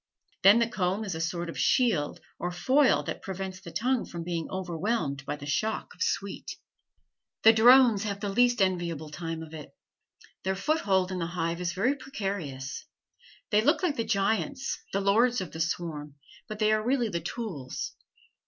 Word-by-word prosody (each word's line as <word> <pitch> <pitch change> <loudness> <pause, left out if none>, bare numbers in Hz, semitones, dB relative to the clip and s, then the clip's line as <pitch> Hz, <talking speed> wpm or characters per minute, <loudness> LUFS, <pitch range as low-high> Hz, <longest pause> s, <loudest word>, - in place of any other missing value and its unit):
Then 195 +3 +8
the 235 -1 +3
comb 195 -2 -1
is 195 -4 -3
a 160 - -4
sort 170 +1 -2
of 165 - -6
shield 210 - +2 0.2
or 175 - -2
foil 255 +11 +3
that - - -5
prevents 190 -1 -5
the 175 - -10
tongue 245 +7 0
from 170 -1 -6
being 170 -1 -3
overwhelmed 175 - -2
by - - -1
the 145 -1 -9
shock 215 +10 -1
of - - -22
the - - +2
sweet. 200 -1 -3 0.9
The 225 - +9
drones 240 -1 +7
have 200 -2 -3
the 205 -1 -3
least 245 -1 +4
enviable 170 -5 -2
time 165 +1 -5
of 160 0 -12
it. 155 -2 -8 0.7
Their 190 0 0
foothold 195 - +1
in 185 - -3
the 165 - -1
hive 170 0 -2
is 170 -1 -1
very 240 +9 +1
precarious. 195 - -5 0.6
They 210 0 +5
look 295 - +2
like 325 -6 +1
the 230 - -1
giants, 225 +6 0
the 195 - 0
lords 230 +5 +3
of 185 - -5
the 160 - -8
swarm, 160 -3 -3 0.3
but 215 - -6
they 215 0 +3
are 215 0 +2
really 245 -1 +1
the 170 -4 -2
tools. 170 - -5
190 Hz, 180 wpm, -28 LUFS, 170-225 Hz, 0.9 s, The